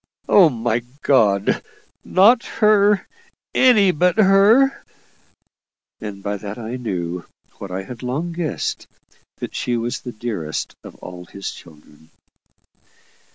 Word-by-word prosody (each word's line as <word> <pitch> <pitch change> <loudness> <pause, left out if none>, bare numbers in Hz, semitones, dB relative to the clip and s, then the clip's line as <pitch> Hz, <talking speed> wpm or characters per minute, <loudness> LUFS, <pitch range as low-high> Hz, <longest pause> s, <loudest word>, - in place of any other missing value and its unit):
"Oh, 185 -5 +6
my 120 -2 -1 0.2
God! 105 -7 +2 0.4
not 225 +6 +4
her! 210 -2 +3 0.5
Any 215 -7 +5
but 180 +3 +1
her!" 215 +7 +4 1.2
And 100 -2 -8
by 100 0 -2
that 100 +1 -7
I 115 +1 -5
knew, 90 -7 -4 0.3
what 100 - -7
I 95 +1 -4
had 115 +4 -10
long 140 +8 -3
guessed, 165 -2 -3 0.5
that - - -6
she 120 -1 -1
was 115 +1 -3
the 125 - -7
dearest 105 -9 -4
of - - -11
all 90 0 -10
his 100 +3 -7
children. 80 -1 -17
120 Hz, 120 wpm, -20 LUFS, -, 1.2 s, Oh